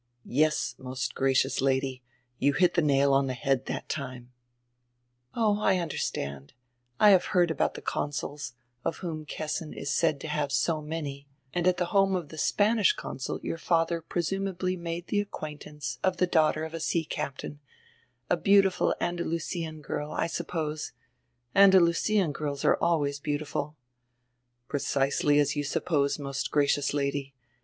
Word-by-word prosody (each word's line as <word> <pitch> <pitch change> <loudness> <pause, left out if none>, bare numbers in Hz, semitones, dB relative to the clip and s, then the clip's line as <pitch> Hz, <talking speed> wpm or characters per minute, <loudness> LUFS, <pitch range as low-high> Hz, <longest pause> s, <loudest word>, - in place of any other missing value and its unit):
"Yes, 155 +4 +1
most 130 0 -4
gracious 135 0 +2
Lady, 130 -1 0 0.4
you 140 +1 +3
hit 175 +3 +3
die 170 - +3
nail 140 -2 +3
on 135 0 +3
die 130 - -1
head 135 0 0
that - - -4
time." 130 -4 -5 1.0
"Oh, 215 -3 +2
I 190 -3 +3
understand. 70 - -3 0.5
I 210 - +8
have 185 -2 +5
heard 175 -2 +4
about - - 0
die - - -8
consuls, 145 -1 -3 0.3
of - - -2
whom 155 -3 -5
Kessin 155 +2 -4
is 140 +1 -3
said 155 -3 +2
to - - -5
have 150 -2 -1
so 155 +2 +1
many, 150 -3 -5 0.3
and 175 0 +1
at 180 -1 +3
die 180 - +1
home 195 +1 +3
of 170 -5 -3
die 155 - -10
Spanish 210 +6 +3
consul 130 - -5
your 165 - -3
fadier 165 0 +1
presumably 185 +2 -2
made 170 0 -5
die 205 - -1
acquaintance 150 -8 -6
of 185 -1 +2
die 180 - +3
daughter 155 -3 +2
of 160 0 -6
a 165 - -4
sea 165 +1 0
captain, 140 0 -5 0.7
a 175 - +2
beautiful 195 0 +4
Andalusian 165 -2 -3
girl, 150 +1 -4
I - - 0
suppose; 160 -2 -3 0.6
Andalusian 190 -1 +5
girls 145 -1 -4
are - - +5
always 145 -4 +1
beautiful" 145 0 -3 0.9
"Precisely 140 +1 +1
as 145 0 +2
you 145 - -1
suppose, 140 0 0
most 140 -2 -3
gracious 145 -1 +2
Lady. 140 -1 -2
155 Hz, 150 wpm, -28 LUFS, 140-175 Hz, 1.0 s, I